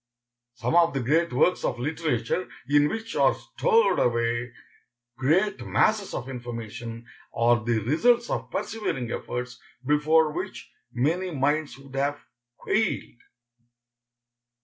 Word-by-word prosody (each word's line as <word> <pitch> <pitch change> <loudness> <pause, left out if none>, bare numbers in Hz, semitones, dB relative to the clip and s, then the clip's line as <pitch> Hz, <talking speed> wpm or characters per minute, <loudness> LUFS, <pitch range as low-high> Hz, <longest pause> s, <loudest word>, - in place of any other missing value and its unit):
Some 125 +5 -1
of 170 -3 +4
the - - +1
great 155 +7 +1
works 150 +8 +2
of - - -1
literature, 150 +2 -1 0.2
in 145 +1 +4
which 225 0 -5
are - - +4
stored 475 0 +2
away 120 0 0 0.6
great 180 +11 +1
masses 215 -2 +1
of 125 - -4
information, 115 -2 -7 0.3
are 120 0 +3
the 120 0 +1
results 235 - +3
of - - -3
persevering 205 - -3
efforts, 125 0 -5 0.2
before 150 +2 +3
which - - -6 0.2
many 165 +9 0
minds 150 0 0
would 135 -1 -15
have 140 +1 0 0.4
quailed. - - -1
140 Hz, 120 wpm, -26 LUFS, 120-170 Hz, 0.6 s, of